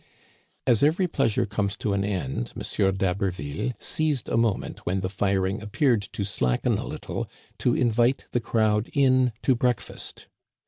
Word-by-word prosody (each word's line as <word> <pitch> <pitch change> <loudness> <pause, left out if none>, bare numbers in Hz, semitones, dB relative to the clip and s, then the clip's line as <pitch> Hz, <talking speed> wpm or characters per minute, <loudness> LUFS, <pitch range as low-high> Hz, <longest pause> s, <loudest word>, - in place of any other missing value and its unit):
As 120 -4 +4
every 165 +6 +3
pleasure 135 -9 +1
comes 100 -1 -2
to 105 - -1
an 100 0 +1
end, 90 -12 -2
M. 95 -1 0
d'Haberville 95 - -1
seized 150 -5 -1
a - - 0
moment 115 -3 0
when 95 +2 -1
the 95 - -2
firing 95 0 0
appeared 115 +2 +2
to 100 - -2
slacken 65 -10 0
a - - -5
little - - -5 0.3
to 120 - +2
invite 120 +2 +2
the 120 - +1
crowd 110 -1 +1
in 130 -3 +4
to 130 - +4
breakfast. 125 -1 -2
105 Hz, 150 wpm, -26 LUFS, 95-125 Hz, 0.3 s, As